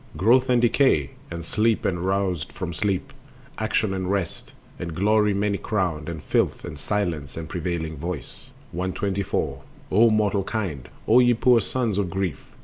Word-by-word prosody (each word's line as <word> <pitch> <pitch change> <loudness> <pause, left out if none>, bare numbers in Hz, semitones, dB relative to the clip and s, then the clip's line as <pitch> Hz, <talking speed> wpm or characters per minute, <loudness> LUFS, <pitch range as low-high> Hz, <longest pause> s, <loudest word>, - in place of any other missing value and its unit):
Growth 125 +6 +4
and 125 -1 +4
Decay, 120 - +3 0.2
and 85 0 -6
Sleep 110 +4 +1
and 90 -2 0
Roused 95 -4 0
from 85 -2 -5
sleep, 95 +2 -1 0.5
Action 110 -2 +1
and 95 -1 -2
Rest, 95 -4 -2 0.3
and 85 -2 -5
Glory 105 +3 +3
many 100 0 0
crowned, 90 -8 -1
And 80 -3 -6
Filth, - - 0
and 75 - -7
Silence 80 -8 -2
and 80 -1 -5
prevailing 85 -2 -3
Voice. 80 -2 -6 0.2
124. 95 -5 -2 0.3
O 115 +5 +6
mortal 105 -2 +2
kind! 90 - -4 0.2
O 115 +3 +7
ye 120 -1 +5
poor 120 0 +4
sons 115 -6 -1
of 95 -3 0
grief! 95 -5 -3
95 Hz, 155 wpm, -24 LUFS, 85-110 Hz, 0.5 s, O